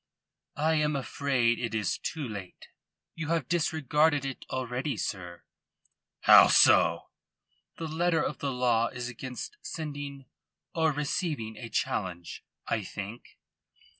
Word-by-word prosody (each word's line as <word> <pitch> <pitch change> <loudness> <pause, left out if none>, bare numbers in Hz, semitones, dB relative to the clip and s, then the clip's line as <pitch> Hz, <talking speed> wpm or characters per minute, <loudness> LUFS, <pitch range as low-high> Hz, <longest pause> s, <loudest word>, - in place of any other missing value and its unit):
"I 155 +2 +2
am 150 -1 +1
afraid 130 -3 +1
it 115 -2 -3
is 105 -2 -1
too 155 -5 -4
late. 100 -5 -9 0.4
You 160 -2 -5
have 165 -5 0
disregarded 155 -3 +2
it 135 -1 -6
already, 130 +2 -2
sir." 90 -3 -5 0.8
"How - - +9
so?" - - +5 0.7
"The 165 - -4
letter 165 +1 +1
of 150 - -3
the 140 - -2
law 120 -2 +2
is 125 0 -5
against 130 - -7
sending 145 -3 -6 0.5
or 160 -1 +2
receiving 145 - -2
a 115 +1 -8
challenge, 90 -5 -3 0.2
I 110 - -1
think." 105 +4 -8
135 Hz, 125 wpm, -29 LUFS, 115-155 Hz, 0.8 s, How